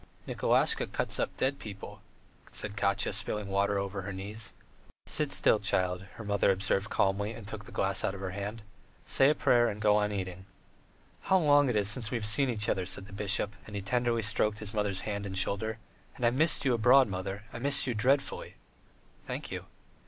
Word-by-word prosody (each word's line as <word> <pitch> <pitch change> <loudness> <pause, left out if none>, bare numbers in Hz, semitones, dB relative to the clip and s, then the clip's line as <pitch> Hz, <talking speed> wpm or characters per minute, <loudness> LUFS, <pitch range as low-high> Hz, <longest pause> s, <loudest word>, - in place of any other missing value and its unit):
"Nikolasha - - +1
cuts - - -1
up - - -2
dead 135 +2 0
people," 100 -3 -9 0.5
said 105 -1 -4
Katya, 100 0 +1
spilling 100 +1 -2
water 100 +1 +1
over 100 0 -3
her 100 - -6
knees. 100 +3 -5 0.5
"Sit - - 0
still, - - +4
child," 90 0 0
her 115 - -9
grandmother 100 -1 +1
observed 95 +2 +1
calmly, 100 +3 0
and 110 -2 -10
took 105 -1 -7
the - - -12
glass 95 0 +1
out 95 - -1
of - - -8
her 95 -1 -4
hand. 100 +3 -5 0.4
"Say 135 - +4
a 150 - +2
prayer, 120 -4 +3
and 105 - -4
go 105 0 +4
on 105 0 +1
eating." 95 -1 -5 0.8
"How 190 - +4
long 145 -5 +4
it 120 - 0
is 105 -1 +2
since 105 +1 +1
we 120 - -1
have 110 - -4
seen 125 +6 +2
each 110 -3 0
other!" 95 -2 -1
said 95 - -3
the 100 - -14
bishop, 100 +1 0
and 105 - -9
he 100 - -2
tenderly 120 +1 0
stroked 105 0 +1
his 105 -1 -4
mother's 105 -3 -1
hand 100 -1 -4
and 95 -1 -5
shoulder; 105 +4 -1 0.4
"and 125 - -2
I 120 - +4
missed 150 +3 +3
you 130 - +3
abroad, 125 +3 +5
mother, 95 +1 -5
I - - -6
missed 140 +3 +3
you 125 - -1
dreadfully." 130 +6 0 0.7
"Thank - - -5
you." - - -5
105 Hz, 205 wpm, -30 LUFS, 100-115 Hz, 0.8 s, abroad